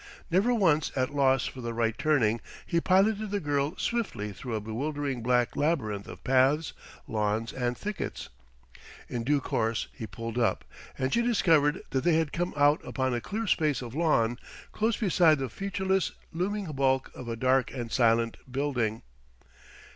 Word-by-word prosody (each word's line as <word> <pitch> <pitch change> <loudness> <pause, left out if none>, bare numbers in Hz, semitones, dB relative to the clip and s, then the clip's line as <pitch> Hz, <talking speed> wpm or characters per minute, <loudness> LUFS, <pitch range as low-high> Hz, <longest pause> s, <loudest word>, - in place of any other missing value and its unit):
Never 195 +8 +3
once 165 - +2
at 130 +1 0
loss 135 -2 +3
for 130 - -6
the 115 -1 -4
right 115 -1 +1
turning, 120 -7 +2 0.2
he 170 -1 +1
piloted 200 +4 +3
the 205 0 -1
girl 145 -1 -1
swiftly 155 - -2
through 115 +4 -5
a - - 0
bewildering 135 +4 -3
black 125 0 +1
labyrinth 110 -10 -1
of - - -10
paths, 135 +4 +3 0.3
lawns 110 +1 -1
and 125 -2 -2
thickets.... 210 0 -5 0.8
In 120 -1 -3
due 145 +4 +2
course 115 -3 -1
he 110 - -7
pulled 115 +3 -5
up, 115 - +1 0.3
and 130 0 -1
she 235 - +3
discovered 165 -11 +3
that 130 - 0
they 170 -1 +4
had 160 -2 0
come 175 +1 -2
out 145 +1 +4
upon 130 -2 -1
a 120 - -1
clear 220 - -3
space 150 - +1
of 120 -1 -8
lawn, 120 -7 +2 0.3
close 220 +1 0
beside 175 -6 +4
the 135 -2 -3
featureless, 190 - -1 0.2
looming 200 +4 -1
bulk 135 -2 +1
of 125 - -9
a 115 - -2
dark 130 +1 +2
and 120 -3 -5
silent 115 -2 +2
building. 125 -5 -1
135 Hz, 165 wpm, -28 LUFS, 120-165 Hz, 0.8 s, they